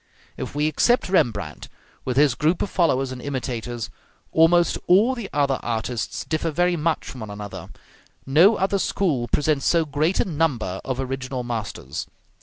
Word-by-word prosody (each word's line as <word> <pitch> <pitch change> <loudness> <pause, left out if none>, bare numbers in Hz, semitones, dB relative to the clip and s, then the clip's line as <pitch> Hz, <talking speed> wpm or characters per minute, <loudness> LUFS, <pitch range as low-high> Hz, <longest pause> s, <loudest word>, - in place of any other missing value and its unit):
If - - -6
we 150 +1 +1
except 185 - +2
Rembrandt 105 - 0 0.4
with 130 0 -2
his 145 -3 +5
group 160 +7 +1
of - - -4
followers 135 -7 +1
and 130 -1 -7
imitators, 120 -4 -4 0.4
almost 170 +1 +4
all 210 +8 +5
the 235 -6 -6
other 140 -2 +1
artists 115 0 -3
differ 160 +1 -1
very 175 +3 +1
much 165 0 -1
from 130 - -8
one 110 -2 -7
another; 105 0 -7 0.6
no 165 +11 +5
other 195 +1 0
school 150 -12 0
presents 145 +2 +1
so 170 -2 +3
great 155 +5 0
a - - +3
number 145 - -1
of 130 -1 -3
original 130 -1 -3
masters. 110 - -5
145 Hz, 160 wpm, -23 LUFS, 120-170 Hz, 0.6 s, his